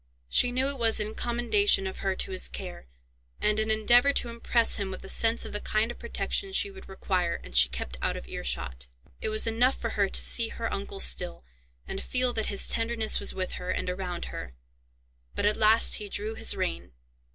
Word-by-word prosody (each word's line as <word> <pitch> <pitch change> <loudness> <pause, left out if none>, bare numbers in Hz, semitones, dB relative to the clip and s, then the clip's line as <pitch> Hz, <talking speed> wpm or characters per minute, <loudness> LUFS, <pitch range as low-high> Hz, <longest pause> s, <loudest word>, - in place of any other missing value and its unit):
She 245 - +4
knew 260 +2 0
it 280 -2 -3
was 225 -1 +3
in 210 +1 -3
commendation 240 - +2
of 190 - -5
her 195 -1 -2
to 190 - -2
his 185 - +1
care, 180 - -8 0.5
and 210 0 +1
an 220 0 -1
endeavour 240 +5 +4
to 240 - +1
impress 235 0 +1
him 200 -2 -3
with 185 - -8
a - - -8
sense 225 +3 +1
of - - -8
the 210 - -1
kind 215 +2 0
of - - -12
protection 390 -1 -2
she 400 - +2
would 385 0 -13
require, 185 -2 -1
and - - -10
she 65 +1 +6
kept 60 -1 -6
out - - -1
of 60 - -10
earshot. 65 -1 -4 0.3
It - - -2
was 215 0 0
enough 235 +4 +2
for 230 - -3
her 200 -2 0
to - - +2
see 230 -1 +3
her 230 0 -5
uncle 195 0 -6
still, 175 - +4 0.4
and 195 - -5
feel 250 -1 +1
that 220 -2 -1
his 200 - +2
tenderness 225 -1 0
was - - -3
with 185 -1 -3
her, 180 - -6
and 180 - -2
around 180 -2 -5
her. 60 0 -8 0.8
But - - -1
at 210 0 +3
last 220 +1 +5
he 210 -2 -7
drew 210 +3 -3
his - - +2
rein. - - -4
215 Hz, 215 wpm, -27 LUFS, 185-235 Hz, 0.8 s, she